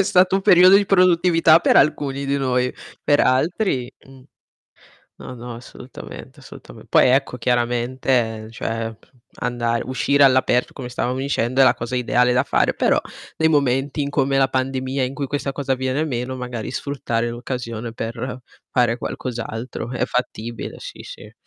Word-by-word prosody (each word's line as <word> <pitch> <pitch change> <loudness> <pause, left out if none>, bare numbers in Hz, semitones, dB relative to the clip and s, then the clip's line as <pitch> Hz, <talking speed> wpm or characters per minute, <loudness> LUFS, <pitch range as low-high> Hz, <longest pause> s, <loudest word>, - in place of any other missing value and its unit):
È - - +6
stato 185 0 +3
un - - -1
periodo 185 -1 +7
di 200 -1 +2
produttività 175 -3 +4
per - - +2
alcuni 140 -1 +2
di 140 +1 0
noi, 125 -1 0 0.3
per 145 - +3
altri 130 - +1 0.2
mh. 135 -1 -16 0.9
No, - - -9
no 120 0 -8
assolutamente 120 +2 -11
assolutame - - -13
poi - - +5
ecco 130 -1 +1
chiaramente 120 -2 0
cioè, 115 0 -4 0.5
andar 120 -1 -1
uscire 140 +2 +2
all'aperto 130 -2 +3
come 125 -3 -7
stavamo 125 +1 -2
dicendo 130 -1 0
è - - +8
la 120 - +6
cosa 120 0 -5
ideale 125 0 +2
da 125 - +3
fare, - - +1
però, - - +2 0.4
nei 160 0 +2
momenti 140 0 +1
in 140 - -3
come 135 -1 +1
la 135 0 +3
pandemia 130 0 -1
in 130 +2 -5
cui 140 -1 -3
questa 140 -1 -3
cosa 135 0 -2
avviene 130 +3 -1
meno, 130 -2 -3
magari 125 -3 -5
sfruttare 120 -5 -2
l'occasione 120 -1 -5
per 120 +3 -5 0.3
fare 120 -2 +2
qualcos'altro. 120 -1 -5
È - - 0
fattibile 120 -2 -4
sì, - - -9
sì. - - -11
130 Hz, 155 wpm, -21 LUFS, 120-140 Hz, 0.9 s, è